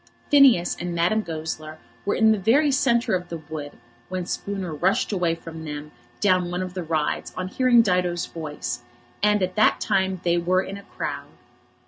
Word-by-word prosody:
Phineas 265 -12 +6
and 175 0 -3
Madame 175 +6 +2
Goesler 155 -3 -5 0.3
were - - +2
in 220 0 +5
the 215 - +2
very 275 +9 +3
centre 240 -5 +2
of 180 -1 -1
the 170 - -4
wood 155 -2 -7 0.4
when 185 -1 -3
Spooner 190 -3 -4
rushed 190 - +1
away 175 -4 +1
from 165 -1 -9
them 150 -1 -6 0.3
down 185 -3 +2
one 180 +1 -2
of 185 -1 -6
the 185 - -4
rides 155 -2 -1
on 185 0 -3
hearing 245 +1 +4
Dido's 180 -3 +1
voice; 150 -6 -5 0.4
and 210 -1 +3
at 185 0 -2
that 215 - +4
time 190 -1 0
they 175 0 +2
were 185 +2 +2
in 195 +1 -7
a - - -10 0.2
crowd. - - -4
180 Hz, 180 wpm, -24 LUFS, 165-205 Hz, 0.4 s, Phineas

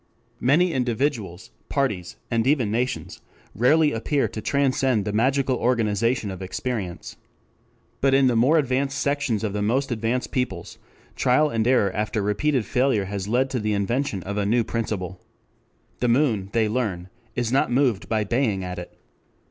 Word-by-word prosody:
Many 165 +7 +3
individuals, 115 - -2 0.2
parties, 105 -11 -1 0.2
and 115 0 +1
even 130 -7 +2
nations, 125 +3 -2 0.3
rarely 150 +7 +4
appear 135 +5 0
to 110 - -6
transcend 130 -4 +1
the 105 - -2
magical 130 +3 +2
organization 115 -2 +1
of 95 0 -8
experience. 95 -1 -4 0.8
But 135 0 +4
in 135 0 +4
the 125 -2 +3
more 130 +8 +4
advanced 135 0 0
sections 140 -8 0
of 105 -3 -2
the 105 - -2
most 130 +6 0
advanced 120 +2 -1
peoples, 120 -11 -3 0.4
trial 145 +4 +3
and 115 0 0
error 115 -6 +3
after 105 0 -1
repeated 120 +5 0
failure 125 -6 +1
has 100 0 -4
led 125 +4 +1
to 125 - -1
the 105 -1 -1
invention 100 0 -1
of 100 +2 -4
a 100 - 0
new 115 +2 +3
principle. 105 -5 -4 0.8
The 125 - +1
moon, 115 -6 +2
they 110 -1 +2
learn, 105 -6 -2 0.3
is 120 -2 -1
not 135 -1 +2
moved 125 -6 +1
by 110 -1 +1
baying 105 -3 0
at 90 -1 -5
it. 90 - -10
115 Hz, 160 wpm, -24 LUFS, 105-130 Hz, 0.8 s, rarely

